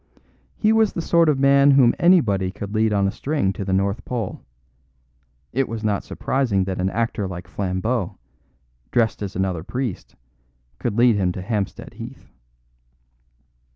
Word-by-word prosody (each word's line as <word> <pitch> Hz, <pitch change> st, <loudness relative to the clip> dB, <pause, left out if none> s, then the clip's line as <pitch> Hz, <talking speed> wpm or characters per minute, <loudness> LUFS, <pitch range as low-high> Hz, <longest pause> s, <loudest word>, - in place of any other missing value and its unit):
He 215 Hz, 0 st, +3 dB
was 220 Hz, -2 st, +3 dB
the 170 Hz, -, -2 dB
sort 170 Hz, -1 st, +4 dB
of 145 Hz, -, +2 dB
man 140 Hz, +1 st, +5 dB
whom 135 Hz, -4 st, +6 dB
anybody 115 Hz, -, +3 dB
could 100 Hz, +2 st, -7 dB
lead 110 Hz, 0 st, +2 dB
on 100 Hz, -1 st, +2 dB
a -, -, 0 dB
string 140 Hz, -9 st, -1 dB
to 100 Hz, -, -5 dB
the 95 Hz, -, -3 dB
North 100 Hz, +3 st, 0 dB
Pole; 115 Hz, -6 st, -4 dB, 1.1 s
it 135 Hz, +1 st, 0 dB
was 115 Hz, -1 st, -5 dB
not 105 Hz, -2 st, 0 dB
surprising 120 Hz, -8 st, 0 dB
that 95 Hz, -1 st, -3 dB
an 95 Hz, -, +1 dB
actor 115 Hz, -1 st, -1 dB
like 90 Hz, -1 st, -7 dB
Flambeau, 95 Hz, +1 st, -2 dB, 0.7 s
dressed 115 Hz, -3 st, +1 dB
as 100 Hz, -1 st, -5 dB
another 95 Hz, -3 st, -1 dB
priest, 120 Hz, 0 st, -5 dB, 0.6 s
could 115 Hz, -3 st, -2 dB
lead 120 Hz, -2 st, +5 dB
him 90 Hz, -3 st, +1 dB
to 95 Hz, -, -6 dB
Hampstead 100 Hz, -1 st, -3 dB
Heath. -, -, -10 dB
110 Hz, 155 wpm, -22 LUFS, 95-130 Hz, 1.1 s, whom